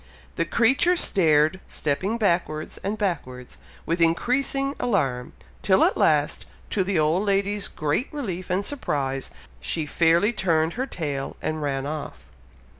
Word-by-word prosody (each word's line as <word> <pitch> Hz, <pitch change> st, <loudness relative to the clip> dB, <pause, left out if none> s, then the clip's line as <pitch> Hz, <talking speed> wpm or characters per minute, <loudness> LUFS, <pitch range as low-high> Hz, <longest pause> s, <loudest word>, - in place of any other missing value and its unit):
The 165 Hz, -, 0 dB
creature 265 Hz, -, +3 dB
stared, 155 Hz, -, +3 dB
stepping 185 Hz, +10 st, -2 dB
backwards 170 Hz, -7 st, -1 dB
and 205 Hz, +2 st, -2 dB
backwards, 135 Hz, -, -4 dB, 0.3 s
with 170 Hz, +1 st, -1 dB
increasing 275 Hz, -, +1 dB
alarm, 135 Hz, -, -1 dB, 0.3 s
till -, -, +4 dB
at -, -, +3 dB
last, 150 Hz, -1 st, +1 dB, 0.2 s
to 195 Hz, -, +1 dB
the 185 Hz, -1 st, 0 dB
old 155 Hz, +4 st, +2 dB
lady's 200 Hz, 0 st, +1 dB
great 155 Hz, -, -2 dB
relief 190 Hz, -, -5 dB
and 185 Hz, +2 st, 0 dB
surprise, 135 Hz, -, -2 dB, 0.3 s
she 70 Hz, -, -2 dB
fairly 170 Hz, +8 st, +3 dB
turned 165 Hz, -5 st, +1 dB
her 260 Hz, +3 st, -3 dB
tail 145 Hz, -, -4 dB
and 155 Hz, 0 st, -3 dB
ran 135 Hz, -2 st, -2 dB
off. 145 Hz, -, -5 dB
170 Hz, 135 wpm, -24 LUFS, 150-205 Hz, 0.3 s, till